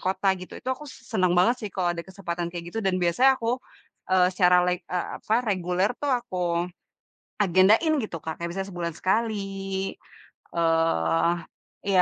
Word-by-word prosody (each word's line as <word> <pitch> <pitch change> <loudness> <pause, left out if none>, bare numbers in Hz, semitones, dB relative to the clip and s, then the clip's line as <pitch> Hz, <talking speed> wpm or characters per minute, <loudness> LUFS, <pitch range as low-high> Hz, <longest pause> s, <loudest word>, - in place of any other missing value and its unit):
kota 190 +1 +1
gitu, 185 - -9
itu - - -13
aku 295 +3 -8
seneng 185 -9 -1
banget 235 +8 +4
sih 210 - -4
kalau 180 -2 0
ada 170 - -5
kesempatan 175 -3 -4
kaya 170 -1 -6
gitu 225 - -2
dan 190 -2 +1
biasanya 245 +10 +4
aku, 240 +2 -1 0.5
eee, 185 -1 +5
secara 180 -1 +5
leg 180 0 0
eee, 180 -1 -1
apa 220 - 0
reguler 185 +1 +1
tuh 290 - -1
aku 245 -7 -1 1.1
agendain 205 - +5
gitu 210 -7 -4
Kak. 160 +1 -7
Kayak 170 - -2
misalnya 195 +2 -4
sebulan 170 -2 -3
sekali, 220 +3 +1 1.2
eee, 165 - +2 0.6
iya 190 -2 +5
185 Hz, 160 wpm, -26 LUFS, 175-215 Hz, 1.2 s, eee